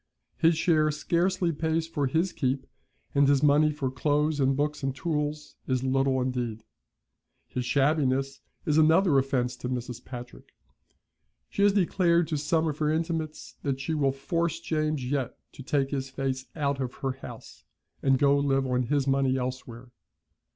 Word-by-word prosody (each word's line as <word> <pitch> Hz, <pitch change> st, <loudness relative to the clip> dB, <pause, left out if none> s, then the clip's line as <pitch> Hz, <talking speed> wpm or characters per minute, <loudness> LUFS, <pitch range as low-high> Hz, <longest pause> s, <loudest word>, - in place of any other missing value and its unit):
His 165 Hz, 0 st, +3 dB
share 160 Hz, -2 st, +3 dB
scarcely 170 Hz, +3 st, 0 dB
pays 160 Hz, +1 st, -1 dB
for 145 Hz, -4 st, -1 dB
his 165 Hz, +7 st, 0 dB
keep, 135 Hz, -2 st, -1 dB, 0.5 s
and 140 Hz, 0 st, +4 dB
his 140 Hz, 0 st, +3 dB
money 150 Hz, +1 st, +5 dB
for 140 Hz, -4 st, -3 dB
clothes 150 Hz, +3 st, +1 dB
and 135 Hz, 0 st, +2 dB
books 150 Hz, +1 st, -1 dB
and 135 Hz, -1 st, -2 dB
tools 150 Hz, -1 st, -3 dB
is 130 Hz, -1 st, 0 dB
little 135 Hz, 0 st, +2 dB
indeed. 125 Hz, -4 st, -2 dB, 0.8 s
His 125 Hz, -1 st, -4 dB
shabbiness 135 Hz, -1 st, +1 dB, 0.2 s
is 155 Hz, 0 st, +3 dB
another 160 Hz, -1 st, +5 dB
offence 130 Hz, -2 st, -1 dB
to 125 Hz, 0 st, -5 dB
Mrs. 125 Hz, -1 st, -4 dB
Patrick. 125 Hz, -1 st, -10 dB, 1.0 s
She -, -, -2 dB
has 200 Hz, 0 st, +5 dB
declared 175 Hz, -3 st, +2 dB
to 155 Hz, -, 0 dB
some 160 Hz, +2 st, +1 dB
of 150 Hz, -1 st, -3 dB
her 150 Hz, -1 st, +1 dB
intimates 160 Hz, -1 st, -3 dB
that 135 Hz, -2 st, -2 dB
she 160 Hz, +4 st, -2 dB
will 140 Hz, -3 st, +2 dB
force 165 Hz, +4 st, -2 dB
James 155 Hz, -4 st, -1 dB
yet 135 Hz, -2 st, -2 dB
to -, -, -11 dB
take 135 Hz, 0 st, 0 dB
his 135 Hz, -1 st, -2 dB
face 130 Hz, -1 st, -3 dB
out 140 Hz, -3 st, -1 dB
of 130 Hz, -2 st, -3 dB
her 135 Hz, -, +1 dB
house, 130 Hz, -3 st, -11 dB, 0.4 s
and 135 Hz, -1 st, +3 dB
go 140 Hz, +1 st, +4 dB
live 135 Hz, -1 st, +1 dB
on 125 Hz, -1 st, +1 dB
his 145 Hz, 0 st, +1 dB
money 135 Hz, -1 st, +2 dB
elsewhere. 125 Hz, -1 st, -5 dB
140 Hz, 165 wpm, -27 LUFS, 130-155 Hz, 1.0 s, money